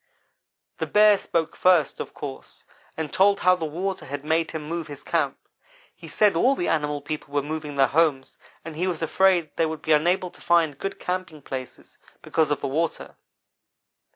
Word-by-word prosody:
"The - - -2
Bear 210 0 +6
spoke 165 -4 -2
first, 180 -5 +3
of - - -5
course, 65 - -8 0.3
and 160 -3 -4
told 200 +1 +4
how 185 0 +5
the 165 -3 -4
water 185 +5 -4
had 145 +1 -6
made 160 +1 +1
him 160 -2 -5
move 165 +1 -4
his 145 -2 -9
camp. - - 0 0.6
He - - -13
said 210 -4 +2
all 255 +11 +3
the 175 - -1
animal 150 -2 0
people 145 -1 -6
were 145 - +2
moving 150 -1 -5
their 135 -1 +5
homes, 145 -1 0 0.3
and 165 -2 -7
he 180 +4 -1
was 170 -3 -2
afraid 180 -1 +2
they 165 - +3
would 160 -1 -6
be 160 - -1
unable 175 +4 +2
to - - -18
find 165 -5 +2
good 195 0 -4
camping 180 -5 -4
places, 130 -2 -8 0.2
because 160 -2 +1
of 145 - -1
the - - -2
water. 160 +5 -2
160 Hz, 185 wpm, -24 LUFS, 150-180 Hz, 0.6 s, Bear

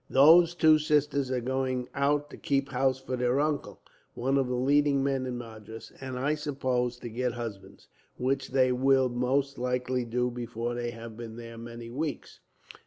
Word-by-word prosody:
Those 165 +5 +6
two 155 -3 +5
sisters 150 -3 +1
are 130 -1 -1
going 130 0 -1
out 145 +1 +1
to - - -9
keep 140 -1 0
house 130 0 +1
for 130 -1 -4
their 125 +2 +1
uncle, 150 -1 -2 0.3
one 130 +3 0
of 135 -2 +2
the 125 - -1
leading 140 +2 +3
men 135 -2 0
in 125 -1 -3
Madras; 110 -2 -10
and, 130 -1 -5
I 140 +4 +1
suppose, 130 -5 -1
to 120 - -6
get 120 +2 -2
husbands, 105 -5 -8 0.3
which 135 +1 0
they 130 -1 +3
will 130 +1 +3
most 130 +3 0
likely 125 0 -1
do 125 +1 -1
before 120 0 -4
they 120 0 -3
have 115 -1 -9
been 115 -1 -8
there 115 0 -9
many 115 0 -8
weeks. 145 +2 -4
130 Hz, 175 wpm, -28 LUFS, 120-140 Hz, 0.3 s, Those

